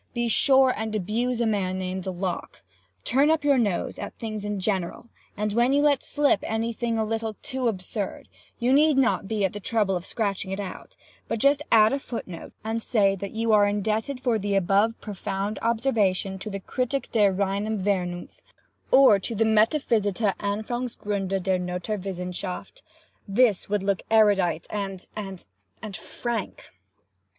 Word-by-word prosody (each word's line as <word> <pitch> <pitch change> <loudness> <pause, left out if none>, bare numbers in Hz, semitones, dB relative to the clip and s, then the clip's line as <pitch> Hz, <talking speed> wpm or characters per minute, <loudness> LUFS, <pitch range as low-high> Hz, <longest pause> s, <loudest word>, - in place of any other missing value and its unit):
Be 240 0 0
sure 265 +2 +4
and 220 0 -3
abuse 230 +5 -1
a - - +2
man 195 -4 0
named 185 0 -4
Locke. 180 - -4 0.4
Turn 275 +4 +3
up 320 -2 +2
your 280 -3 +4
nose 200 -7 -1
at - - -6
things 215 -2 -5
in 205 -1 -3
general, 190 +3 -2 0.3
and 210 0 -1
when 240 +4 +3
you 285 +1 +3
let 285 -3 +3
slip 290 -1 +2
any 225 +1 -2
thing 230 0 -2
a 220 - +1
little 225 0 -3
too 260 -1 -2
absurd, 200 -1 -4 0.3
you 245 +2 +2
need 300 0 +5
not 250 -6 +2
be 210 -2 0
at 190 - -2
the 205 - -5
trouble 205 -2 0
of 175 - -3
scratching 200 -2 -2
it 195 +1 -3
out, 200 -2 -7 0.3
but 230 - -1
just 280 +5 +3
add 220 +1 +6
a 280 - 0
footnote 190 -10 -7
and 225 +1 -2
say 200 -4 +2
that 195 +1 -6
you 225 0 0
are 205 -1 +6
indebted 215 +6 -1
for 245 -4 +1
the 200 0 -1
above 200 +4 +2
profound 200 0 -4
observation 215 -5 +1
to 215 - -6
the 195 -1 -4
'Kritik 255 +6 -2
der 205 -4 +4
reinem 200 +3 -1
Vernunft,' 180 -3 -2 0.5
or 260 -7 +7
to 230 +4 -4
the 225 +2 +2
'Metaphysithe 220 -3 +2
Anfongsgrunde 205 -3 -2
der 185 -1 +1
Noturwissenchaft.' 180 - -4 0.5
This 205 -1 +2
would 205 -1 0
look 195 -1 0
erudite 200 -7 +3
and—and—and 190 - -7
frank. 235 -2 -5
210 Hz, 160 wpm, -25 LUFS, 195-230 Hz, 0.5 s, or